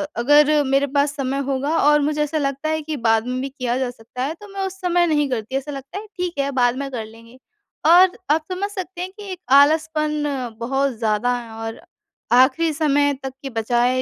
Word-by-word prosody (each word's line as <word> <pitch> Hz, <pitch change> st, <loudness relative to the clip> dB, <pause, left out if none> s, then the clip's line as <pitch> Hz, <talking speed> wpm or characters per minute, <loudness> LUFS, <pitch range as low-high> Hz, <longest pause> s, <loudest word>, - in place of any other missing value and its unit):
अगर 295 Hz, +4 st, +4 dB
मेरे 275 Hz, +1 st, +1 dB
पास 285 Hz, 0 st, +1 dB
समय 275 Hz, -1 st, -2 dB
होगा 280 Hz, +4 st, 0 dB
और 295 Hz, +1 st, +5 dB
मुझे 300 Hz, +1 st, 0 dB
ऐसा 300 Hz, +1 st, -2 dB
लगता 275 Hz, +1 st, -2 dB
है 315 Hz, 0 st, -1 dB
कि 305 Hz, 0 st, -4 dB
बाद 225 Hz, +1 st, +2 dB
में 255 Hz, 0 st, -2 dB
भी 275 Hz, -, -3 dB
किया 255 Hz, -3 st, -2 dB
जा 260 Hz, -1 st, -1 dB
सकता 245 Hz, +1 st, -7 dB
है, 285 Hz, +4 st, -2 dB
तो 415 Hz, +5 st, -13 dB
मैं 390 Hz, -1 st, -2 dB
उस 380 Hz, 0 st, -10 dB
समय 350 Hz, -1 st, +2 dB
नहीं 295 Hz, -3 st, +1 dB
करती। 245 Hz, 0 st, -3 dB
ऐसा 275 Hz, +2 st, -5 dB
लगता 275 Hz, +7 st, -7 dB
है 430 Hz, -, -11 dB
ठीक 360 Hz, -1 st, -2 dB
है, 280 Hz, 0 st, 0 dB
बाद 245 Hz, -2 st, +2 dB
में 275 Hz, 0 st, -4 dB
कर 230 Hz, -4 st, -4 dB
लेंगे। 230 Hz, +3 st, -16 dB, 0.5 s
और 355 Hz, +3 st, +6 dB
आप 310 Hz, +1 st, +2 dB
समझ 385 Hz, +3 st, -2 dB
सकते 375 Hz, -3 st, -6 dB
हैं 365 Hz, -, -3 dB
कि 410 Hz, -1 st, -9 dB
एक 365 Hz, -, -6 dB, 0.2 s
आलसपन 305 Hz, +1 st, +3 dB, 0.4 s
बहुत 270 Hz, +3 st, 0 dB
ज़्यादा 220 Hz, +2 st, +1 dB
है, 235 Hz, -2 st, -9 dB
और 225 Hz, 0 st, -6 dB, 0.6 s
आख़िरी 285 Hz, +6 st, +4 dB
समय 290 Hz, -2 st, +2 dB
तक 265 Hz, -1 st, -5 dB
की 275 Hz, -, -5 dB
बचाए 240 Hz, +2 st, +1 dB
280 Hz, 215 wpm, -21 LUFS, 250-315 Hz, 0.6 s, और